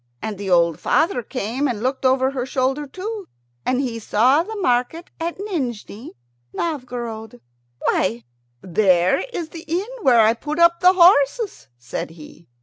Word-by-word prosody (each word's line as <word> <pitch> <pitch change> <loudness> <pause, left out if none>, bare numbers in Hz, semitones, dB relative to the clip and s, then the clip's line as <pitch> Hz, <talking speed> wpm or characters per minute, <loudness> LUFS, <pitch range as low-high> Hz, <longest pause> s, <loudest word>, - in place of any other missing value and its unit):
And 210 - -5
the 200 -1 -4
old 170 -3 +3
father 330 -6 +1
came 250 +3 -2
and 230 -4 -3
looked 265 +1 -2
over 260 0 +2
her 260 -2 -3
shoulder 265 +3 -1
too, 395 +5 -6 0.4
and 255 0 +1
he 240 -4 -2
saw 250 +8 +3
the 435 +6 -6
market 320 - -1
at 335 +1 -3
Nijni 255 - -5 0.4
Novgorod. 240 - -5 0.4
"Why, 115 +1 0 0.4
there 185 -1 +3
is 335 -8 -4
the 330 +1 -9
inn 350 +5 -1 0.2
where 245 - +5
I 220 +1 +5
put 295 +6 -5
up 340 0 +5
the 365 +1 +6
horses," 355 - +3
says 120 +3 -5
he. 165 +1 -14
260 Hz, 150 wpm, -21 LUFS, 220-335 Hz, 0.4 s, the